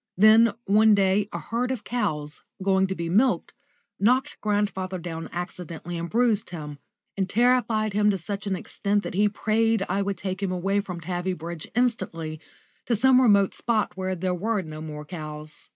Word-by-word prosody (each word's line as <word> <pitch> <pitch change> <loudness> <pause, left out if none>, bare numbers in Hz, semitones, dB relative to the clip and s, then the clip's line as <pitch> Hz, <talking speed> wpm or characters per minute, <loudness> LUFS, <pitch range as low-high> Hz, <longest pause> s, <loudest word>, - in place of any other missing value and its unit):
Then 215 +2 +6
one 215 +2 +5
day 200 +1 +2
a - - -4
herd 240 +2 -2
of 260 -4 -3
cows, 155 -11 -3 0.2
going 190 0 +3
to 190 - -3
be 170 -1 -3
milked, 195 +1 +2 0.5
knocked 255 +7 +2
grandfather 205 -3 -1
down 165 -2 -6
accidentally 175 -1 -6
and 170 0 -4
bruised 230 -3 +1
him, 150 -4 -7 0.4
and 190 -1 -1
terrified 230 -2 +2
him 210 +1 +3
to 200 - +1
such 200 +3 -5
an 195 - 0
extent 205 +3 -1
that - - -5
he 205 +3 +3
prayed 220 0 +1
I 200 - 0
would 200 0 -2
take 190 0 -4
him 195 -2 -1
away 195 +3 0
from 180 -4 -7
Tavybridge 175 -1 -4
instantly, 165 -10 -1 0.5
to 235 - +2
some 255 +3 +5
remote 200 -5 +4
spot 225 -3 0
where 185 0 -2
there 180 +1 -1
were 205 +3 -1
no 155 -1 -8
more 150 -1 -7
cows. 155 -2 -8
195 Hz, 175 wpm, -25 LUFS, 175-215 Hz, 0.5 s, Then